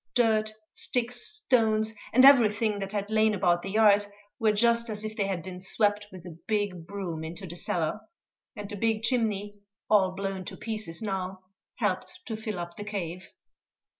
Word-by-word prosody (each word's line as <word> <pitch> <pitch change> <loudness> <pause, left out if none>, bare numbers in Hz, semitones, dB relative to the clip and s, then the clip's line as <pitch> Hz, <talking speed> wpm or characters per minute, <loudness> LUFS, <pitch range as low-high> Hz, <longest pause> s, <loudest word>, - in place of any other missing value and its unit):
Dirt, 220 -3 +3 0.2
sticks, 245 0 -1
stones, 220 - +1 0.2
and 255 +3 +7
everything 220 -5 +5
that 195 0 -4
had 205 0 -3
lain 220 -1 +3
about 175 -2 +2
the 195 - -5
yard 205 -1 +5 0.3
were 220 -2 +4
just 235 +2 +2
as 210 0 -4
if 215 0 -5
they 200 -3 0
had 185 -4 -2
been 180 0 -7
swept 205 +2 0
with 185 -2 -11
a 170 -2 -10
big 205 -6 -1
broom 180 -5 -4
into 165 +4 -7
the 170 -1 -7
cellar; 170 +2 -1 0.6
and 205 -1 -6
the 205 - -6
big 225 +1 0
chimney 210 -4 0 0.3
all 195 -3 +5
blown 195 -1 -3
to - - -7
pieces 215 -5 -4
now 190 -2 -3 0.3
helped - - -2
to 225 - -4
fill 215 -2 -4
up 170 0 -6
the 205 - -5
cave. 185 -4 -5
205 Hz, 175 wpm, -28 LUFS, 185-220 Hz, 0.6 s, and